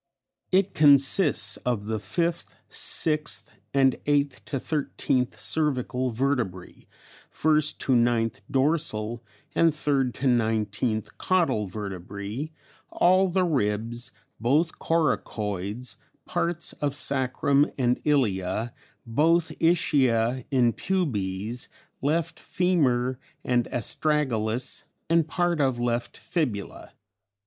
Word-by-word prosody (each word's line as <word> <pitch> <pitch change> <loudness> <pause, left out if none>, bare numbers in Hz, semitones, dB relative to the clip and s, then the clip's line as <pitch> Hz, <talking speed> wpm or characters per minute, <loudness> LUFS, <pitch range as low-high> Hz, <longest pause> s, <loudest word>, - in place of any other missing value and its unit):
It 190 +1 +3
consists 145 +3 +4
of 120 -5 -2
the 110 0 -2
5th, 170 - -2 0.2
6th, 150 -1 0 0.3
and 135 -2 +3
8th 140 -6 +1
to 105 - -3
13th 130 -3 -1
cervical 130 -4 0
vertebrae, 120 -7 -2 0.4
1st 155 -1 +1
to 130 - 0
9th 115 -3 +2
dorsal 130 -6 0 0.3
and 165 -1 +4
3rd 140 -4 0
to 140 - -4
19th 110 -2 0
caudal 140 - +1
vertebrae, 100 - -5 0.4
all 185 +2 +4
the 185 +1 +2
ribs, 120 -6 -1 0.3
both 150 +8 +1
coracoids, 105 - -1 0.3
parts 170 0 -1
of 145 -1 0
sacrum 140 +1 +2
and 125 -2 +1
ilia, 110 -6 0 0.3
both 160 +8 +2
ischia 130 -7 +2
and 125 -4 +3
pubes, 115 - -2 0.3
left 160 +4 0
femur 130 -9 +1 0.2
and 120 -2 +1
astragalus, 125 -2 0 0.3
and 165 -2 +4
part 175 -1 0
of 130 -3 +1
left 120 0 -2
fibula. 125 - -3
130 Hz, 100 wpm, -26 LUFS, 115-155 Hz, 0.4 s, consists